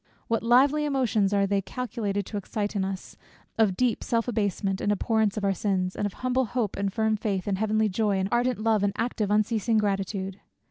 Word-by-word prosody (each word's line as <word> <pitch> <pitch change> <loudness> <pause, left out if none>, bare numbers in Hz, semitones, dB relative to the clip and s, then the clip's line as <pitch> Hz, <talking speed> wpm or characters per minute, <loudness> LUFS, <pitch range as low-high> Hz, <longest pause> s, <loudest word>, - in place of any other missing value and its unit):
What 230 -1 0
lively 270 +6 +4
emotions 250 -8 +1
are 200 -1 +3
they 200 0 +1
calculated 205 -3 -3
to 210 - -5
excite 205 +1 -3
in 195 - +1
us 190 -1 -5 0.4
of 200 -5 +3
deep 245 -3 +1
self 230 0 0
abasement, 200 -4 -1
and 205 - +1
abhorrence 215 0 +1
of 210 - -2
our 195 -1 +2
sins; 185 -2 -1
and 205 - -1
of 200 - -8
humble 255 +1 0
hope, 225 -3 -2
and 200 0 -1
firm 220 +1 +1
faith, 200 -3 -2
and 195 -2 -1
heavenly 215 0 +2
joy, 205 0 0
and 190 0 0
ardent 245 +1 +1
love, 215 -1 +2
and 200 -1 +1
active 225 -3 -1
unceasing 215 +1 +2
gratitude! 195 -1 -1
210 Hz, 200 wpm, -26 LUFS, 195-230 Hz, 0.4 s, lively